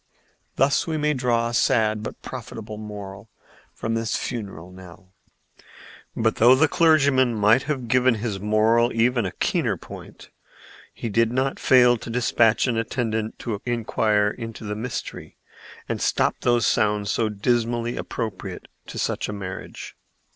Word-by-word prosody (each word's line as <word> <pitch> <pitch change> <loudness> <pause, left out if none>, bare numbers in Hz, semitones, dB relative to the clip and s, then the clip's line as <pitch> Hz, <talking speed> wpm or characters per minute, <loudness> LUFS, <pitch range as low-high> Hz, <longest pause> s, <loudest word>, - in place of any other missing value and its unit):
Thus 135 +4 +2
we 160 -1 -1
may 150 0 +1
draw 120 -3 0
a - - -6
sad 110 -3 +2
but - - -8
profitable 110 -1 -8
moral 105 -1 -9 0.4
from 115 - -4
this 115 0 -1
funeral 95 -7 -5
knell." 90 0 -14 1.0
But, 110 0 0
though 120 +3 +7
the 155 +4 +4
clergyman 140 -7 +3
might 105 +4 +4
have 130 -5 -2
given 125 +1 +3
his 105 -3 -3
moral 110 +3 +2
even 120 -2 +2
a - - -5
keener - - -1
point, - - -12 0.6
he - - -6
did 115 +1 +2
not 130 +2 -1
fail 125 -2 +5
to 115 - -9
despatch 115 -1 +2
an 120 -3 0
attendant 110 -1 -2
to 110 -4 -3
inquire 110 -3 +1
into 115 -1 -8
the 105 -1 -4
mystery 115 +4 -6 0.5
and - - -3
stop - - +2
those 120 -2 +2
sounds 105 -1 +1
so 110 -2 0
dismally 120 +2 -1
appropriate 110 -4 -5 0.2
to - - -8
such - - -2
a - - -3
marriage. 95 -2 -7
115 Hz, 145 wpm, -23 LUFS, 105-125 Hz, 1.0 s, though